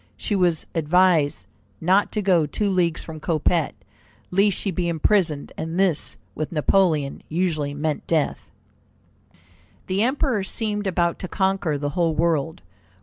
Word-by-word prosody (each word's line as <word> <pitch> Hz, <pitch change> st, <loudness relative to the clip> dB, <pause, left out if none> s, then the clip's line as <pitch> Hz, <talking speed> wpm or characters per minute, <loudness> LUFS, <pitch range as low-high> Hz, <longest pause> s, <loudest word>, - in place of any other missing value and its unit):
She 210 Hz, -, -2 dB
was 175 Hz, -4 st, +1 dB
advised 165 Hz, -2 st, +2 dB, 0.3 s
not 190 Hz, +5 st, +2 dB
to 210 Hz, -, -1 dB
go 175 Hz, -5 st, +3 dB
two 200 Hz, +7 st, -1 dB
leagues 175 Hz, -3 st, +1 dB
from 160 Hz, -1 st, -8 dB
Coppet, 160 Hz, 0 st, 0 dB, 0.6 s
lest 195 Hz, +1 st, +3 dB
she 195 Hz, -, -2 dB
be 175 Hz, 0 st, -2 dB
imprisoned, 165 Hz, -3 st, +1 dB
and 165 Hz, +3 st, -4 dB
this 185 Hz, -6 st, +1 dB, 0.2 s
with 155 Hz, -, -4 dB
Napoleon 155 Hz, -3 st, +1 dB
usually 155 Hz, -4 st, -1 dB
meant 150 Hz, 0 st, -2 dB
death. 160 Hz, -3 st, -1 dB, 1.4 s
The 190 Hz, +2 st, 0 dB
Emperor 255 Hz, -2 st, +1 dB
seemed 210 Hz, 0 st, -3 dB
about 170 Hz, -2 st, 0 dB
to 185 Hz, -, -5 dB
conquer 190 Hz, -6 st, 0 dB
the 145 Hz, 0 st, -2 dB
whole 165 Hz, +1 st, 0 dB
world. 160 Hz, -, 0 dB
170 Hz, 140 wpm, -23 LUFS, 155-195 Hz, 1.4 s, go